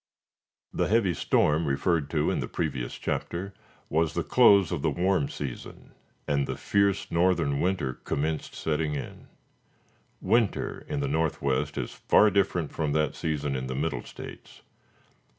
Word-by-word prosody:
The - - 0
heavy 105 -5 +2
storm 80 0 +2
referred 70 +2 0
to - - +1
in - - -1
the - - -3
previous 70 -7 -3
chapter, 95 +3 -3 0.3
was 80 +1 0
the 85 - 0
close 100 - +5
of 85 -5 -2
the 80 - +2
warm 90 -1 +1
season, 65 -4 -7 0.3
and 70 -1 +1
the - - -4
fierce 100 -1 +1
northern 85 -5 +2
winter 90 -8 0
commenced 75 +4 -3
setting 75 -1 -1
in. 70 - -7 0.9
Winter 110 +2 0
in 70 - -2
the 70 - -1
northwest 70 -2 0
is - - -3
far 105 0 +4
different 90 -5 +1
from 75 -3 -1
that 75 -1 +1
season 75 -3 -2
in 65 0 -3
the 65 - -4
Middle 70 -3 -1
States. - - -11
80 Hz, 150 wpm, -27 LUFS, 70-90 Hz, 0.9 s, close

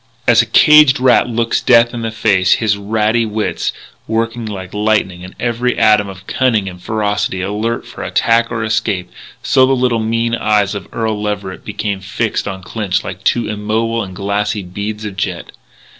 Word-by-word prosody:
As - - +6
a - - -3
caged 150 -3 +6
rat 125 -1 +4
looks 115 0 0
death 120 -1 +4
in 120 - -4
the 115 - -2
face, 100 -4 +2
his 110 -2 +1
ratty 110 +3 0
wits 110 -1 -2 0.4
working 115 +1 -2
like 95 -3 -7
lightning 105 -4 0
and 95 - -11
every 120 +1 -1
atom 105 -2 +4
of 95 0 -11
cunning 115 -6 +1
and 90 -1 -8
ferocity 105 -3 -1
alert 105 +4 -2
for - - -10
attack 115 0 +1
or 115 -1 -2
escape, 105 -4 -1 0.3
so 130 - +4
the 135 - +2
little, 125 -2 +1
mean 115 +1 -1
eyes 105 -3 +1
of 100 -2 -6
Earl 110 -2 -2
Leverett 100 -3 -4
became 105 -1 -3
fixed 105 +4 -2
on 95 -2 -6
Clinch 100 0 -2
like 95 0 -7
two 120 - +1
immobile 110 +2 -1
and 95 -3 -7
glassy 100 +1 -2
beads 105 +4 -5
of 100 -2 -6
jet. 95 -3 -3
110 Hz, 175 wpm, -16 LUFS, 100-115 Hz, 0.4 s, As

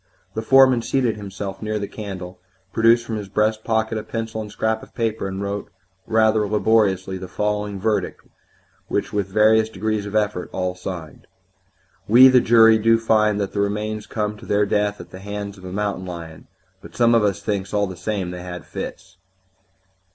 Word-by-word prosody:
The 110 - -3
foreman 130 0 +5
seated 125 -2 0
himself 100 -1 -6
near 110 0 -2
the 100 -1 -3
candle, 95 -4 -8 0.3
produced 115 +1 +4
from 115 -2 -3
his 100 -2 -7
breast 110 +2 0
pocket 110 -1 0
a - - -7
pencil 115 -1 -4
and 105 -1 -8
scrap 110 +1 -1
of - - -15
paper, 110 -3 -1
and 95 +1 -4
wrote 100 +1 -4 0.4
rather 110 -1 +3
laboriously 100 -3 +1
the 95 - -7
following 105 0 -2
verdict, 110 +2 -1 0.7
which - - -2
with 100 -2 0
various 110 +2 +4
degrees 110 0 -2
of 105 - -6
effort 105 -4 0
all 90 -1 -2
signed: 90 -3 -8 0.8
"We, 125 +5 +8
the 130 -1 +5
jury, 115 -1 +6
do 115 +1 +4
find 110 -2 +2
that 100 -1 -3
the - - -2
remains 105 +1 -2
come 105 -1 -3
to - - -13
their 105 0 +2
death 105 0 0
at - - -11
the 95 - -9
hands 100 0 -6
of 95 - -13
a 90 - -7
mountain 100 -1 -3
lion, 85 -3 -9 0.3
but - - -13
some 120 -1 +4
of 115 -2 +4
us 100 -1 0
thinks, 100 -2 -2
all 105 -1 +1
the 95 -2 -7
same, 95 0 -3
they 90 0 -7
had 90 0 -8
fits." - - -8
105 Hz, 190 wpm, -22 LUFS, 95-110 Hz, 0.8 s, We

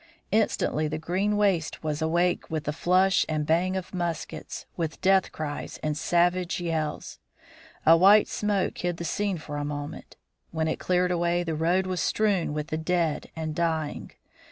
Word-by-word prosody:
Instantly 195 -7 +1
the 155 +1 -3
green 190 +6 0
waste 190 -8 +1
was 155 0 -2
awake 170 +3 +1
with 155 -1 -2
the 150 - -2
flash 185 +4 +3
and 155 -1 -1
bang 175 +4 +1
of 185 0 -6
muskets, 175 -3 -4
with 160 -3 -3
death 190 0 +3
cries 145 -2 -5
and 155 -1 0
savage 175 +3 +1
yells. 165 -3 -3 0.7
A 165 - +8
white 200 +5 +6
smoke 205 -3 -1
hid 175 -1 -2
the 170 - -5
scene 200 +1 -1
for 150 -2 -6
a 145 - -2
moment. 145 +1 -6 0.3
When 160 -1 -1
it 160 - -2
cleared 180 0 +1
away, 175 0 +1
the 165 -2 -2
road 170 +4 +1
was 185 -3 -2
strewn 200 -6 +1
with 150 +1 -4
the 155 - -2
dead 165 -1 0
and 160 -1 -3
dying. 160 -2 -2
170 Hz, 170 wpm, -27 LUFS, 155-185 Hz, 0.7 s, A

